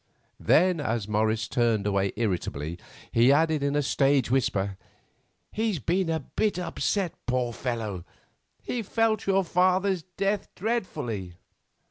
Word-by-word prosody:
Then, 180 0 +4
as 115 -6 -1
Morris 110 0 +1
turned 115 -3 +1
away 100 -1 +1
irritably, 85 -7 -2 0.3
he 120 +3 +5
added 155 +1 +3
in 140 0 0
a 145 - +2
stage 135 -2 +2
whisper, 100 -7 +1 0.8
"He's 220 -3 0
been 175 +4 0
a 160 -1 0
bit 205 +7 -1
upset, 180 0 -1
poor 125 -1 0
fellow! 110 -7 -3 0.6
He 245 - -2
felt 220 0 0
your 195 0 +3
father's 185 +1 +2
death 195 +4 -2
dreadfully." 150 - -3
140 Hz, 125 wpm, -27 LUFS, -, 0.8 s, he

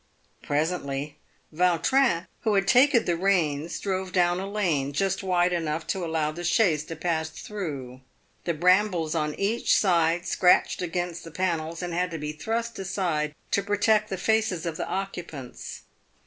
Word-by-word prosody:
Presently 145 -2 -2 0.3
Vautrin, 180 - +2
who 215 -3 +1
had 195 -1 +2
taken 250 +2 +5
the 175 - +1
reins, 170 -4 0
drove 190 -1 -2
down 175 -1 +2
a 195 +1 -4
lane, 165 -10 0
just 195 +5 0
wide 180 -2 +2
enough 160 -2 -2
to 190 - -2
allow 160 -2 0
the 175 +3 -7
chaise 175 -4 +2
to 165 - -6
pass 160 -1 -1
through. 140 -13 -6 0.4
The 170 - 0
brambles 180 -1 +3
on 150 -2 -1
each 215 +4 +1
side 175 -2 +2
scratched 180 0 +3
against 175 -1 -3
the 165 - -9
panels 165 -1 -2
and 175 -1 -3
had 180 +1 0
to 165 - -5
be 150 0 -4
thrust 225 +9 -3
aside 170 -6 -1 0.2
to 200 - +2
protect 210 +2 +2
the 190 - -3
faces 215 -3 +1
of 165 -2 -3
the - - -4
occupants. 175 -9 -6
175 Hz, 160 wpm, -26 LUFS, 160-195 Hz, 0.4 s, taken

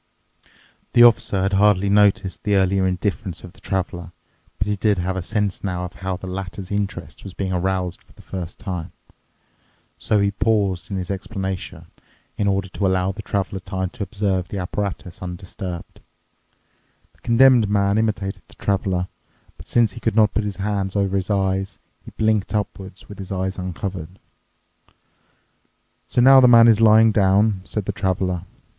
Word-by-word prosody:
The 120 - +7
Officer 105 -5 +4
had 95 +1 0
hardly 100 -1 +4
noticed 100 -2 +2
the 105 -1 +1
earlier 95 0 +2
indifference 95 -1 -3
of 90 - -11
the - - -18
Traveler, 90 -3 -3 0.5
but 100 - -1
he 105 - 0
did 105 0 +1
have 90 +1 -2
a 95 - -2
sense 105 +1 -2
now 90 -2 -2
of 90 - -8
how 95 -1 -4
the 95 - -10
latter's 95 +1 -6
interest 100 -3 -4
was 95 -2 -9
being 95 -1 -2
aroused 90 0 -1
for - - -25
the - - -17
first 90 -2 -6
time. 90 -4 -5 1.1
So 105 - +1
he 100 0 +2
paused 100 -3 0
in 100 - -3
his 90 0 -4
explanation 95 -1 -5 0.5
in 100 - -1
order 95 -1 0
to 95 +1 -1
allow 95 0 +1
the 105 +3 -8
Traveler 100 -2 -2
time 95 -1 -4
to - - -11
observe 95 -2 -1
the 100 - -6
apparatus 95 -1 -4
undisturbed. 90 0 -7 1.1
The - - -30
Condemned 120 -2 +5
Man 100 0 +2
imitated 105 -3 -2
the - - -19
Traveler, 95 -2 -1 0.5
but - - -14
since 115 -3 +2
he 120 - -9
could 115 -2 -1
not 105 -3 +4
put 110 - 0
his 100 -1 -4
hand 100 -1 -2
over 100 -1 +1
his 95 0 -1
eyes, 95 -1 0 0.3
he - - -10
blinked 110 -1 0
upward 100 -2 -3
with 100 - -11
his 95 -1 -7
eyes 95 0 -2
uncovered. 90 -1 -5 1.9
"So 120 - +1
now 135 +2 +8
the 125 - +7
man 115 -1 +8
is 115 -1 +5
lying 110 0 +6
down," 100 0 +3
said 105 -3 -4
the - - -1
Traveler. 90 -1 -1
95 Hz, 170 wpm, -22 LUFS, 95-105 Hz, 1.9 s, now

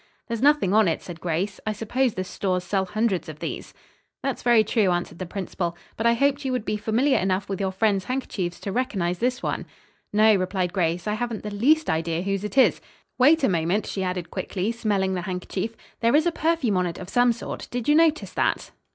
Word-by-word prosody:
"There's 230 -1 -3
nothing 285 -9 +4
on 215 -2 +5
it," 165 - -1
said 170 -3 -9
Grace. 180 +4 -2
"I 215 - -1
suppose 235 +3 0
the 185 - -2
stores 185 -1 -2
sell 190 +1 0
hundreds 210 -3 -1
of 155 - -8
these." - - -5 0.5
"That's 270 -2 -2
very 235 -2 +5
true," 215 -2 +2
answered 175 -1 -2
the 185 - -4
principal, 175 -2 -4 0.2
"but 225 - +1
I 235 - +4
hoped 280 +3 +1
you 265 - -1
would 250 -4 -2
be 215 - -1
familiar 230 +6 +2
enough 190 +1 0
with 195 -2 -3
your 190 -1 0
friends' 195 -1 +1
handkerchiefs 200 -9 -3
to 200 - -4
recognize 190 -7 -1
this 250 +2 -1
one." - - -2 0.4
"No," 215 +1 +5
replied 185 -1 -1
Grace, 175 -2 0
"I 210 - +1
haven't 230 0 -3
the 210 - -5
least 300 +10 +3
idea 165 +1 -1
whose 195 0 -1
it 210 +5 -5
is. 265 - +5 0.4
Wait 295 +4 +5
a - - +5
moment," 175 +3 +1
she 195 - -4
added 180 -2 -3
quickly, 195 +3 -2
smelling 205 -5 0
the 180 - -2
handkerchief; 185 +4 -4 0.2
"there 230 +3 +3
is 310 +2 +4
a 345 - +3
perfume 315 - +1
on 180 -1 +1
it 170 - -5
of 180 - -8
some 245 +4 +3
sort. 235 - -6
Did 245 -2 -4
you 295 - +5
notice 320 0 +3
that?" - - 0
210 Hz, 220 wpm, -24 LUFS, 185-240 Hz, 0.5 s, on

